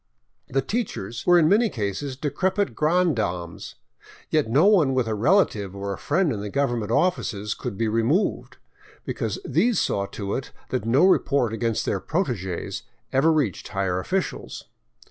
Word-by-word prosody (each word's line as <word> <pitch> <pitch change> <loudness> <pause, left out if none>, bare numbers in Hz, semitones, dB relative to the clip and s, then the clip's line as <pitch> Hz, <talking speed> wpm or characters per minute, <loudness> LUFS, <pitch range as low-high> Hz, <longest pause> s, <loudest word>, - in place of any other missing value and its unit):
The 135 0 0
teachers 120 - -4
were 175 0 +7
in 160 -3 +5
many 215 +6 +4
cases 115 - -3
de 145 0 -2
crepit 195 +4 0
granddames, 115 - 0 0.6
yet 150 -7 +2
no 145 +10 +4
one 170 -11 +4
with 130 -2 +2
a 110 - -1
relative 110 - +2
or 100 0 -3
a - - -6
friend 165 0 +1
in 100 - -4
the 105 - -4
gov 140 +5 +1
ernment 115 -3 -3
offices 115 - 0
could 95 - -6
be 115 - 0
removed, 115 - 0 0.5
because - - -3
these 240 - +2
saw 100 0 0
to 100 -1 -5
it 130 - -4 0.2
that 125 -4 -2
no 130 +9 +4
report 140 - +2
against 115 -1 -1
their 100 - 0
protegees 120 - -2 0.3
ever 135 +5 +4
reached 145 - 0
higher 95 -2 -1
officials. 190 - -3
130 Hz, 165 wpm, -24 LUFS, 105-170 Hz, 0.6 s, were